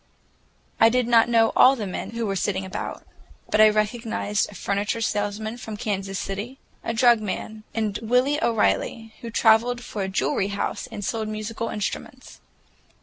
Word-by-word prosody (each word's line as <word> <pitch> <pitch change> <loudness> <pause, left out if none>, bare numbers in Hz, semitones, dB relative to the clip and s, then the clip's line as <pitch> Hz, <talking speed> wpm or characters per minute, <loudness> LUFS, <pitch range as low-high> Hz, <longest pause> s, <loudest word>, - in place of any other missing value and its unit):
I 225 - +7
did 250 0 +1
not 235 -1 +5
know 225 -1 +4
all 265 +2 +7
the 220 -5 -4
men 185 - -5
who 230 0 -3
were 195 -2 -1
sitting 190 0 -1
about, 190 +1 -6 0.5
but 215 - +4
I 215 - +8
recognized 215 -1 -1
a 205 - -12
furniture 200 +4 -1
salesman 215 +1 -2
from 220 -2 -7
Kansas 195 -3 -3
City, 205 +9 -5 0.3
a - - -2
drug 235 0 +4
man, 215 +1 -5
and 215 -3 -1
Willy 250 +6 +2
O'Reilly, 225 0 0
who 235 - -6
traveled 235 +2 +3
for 210 - -5
a 190 - -2
jewelry 190 0 0
house 200 0 -3
and 205 - -6
sold 220 0 -2
musical 215 +2 -4
instruments. 210 -2 -5
220 Hz, 165 wpm, -24 LUFS, 205-230 Hz, 0.5 s, I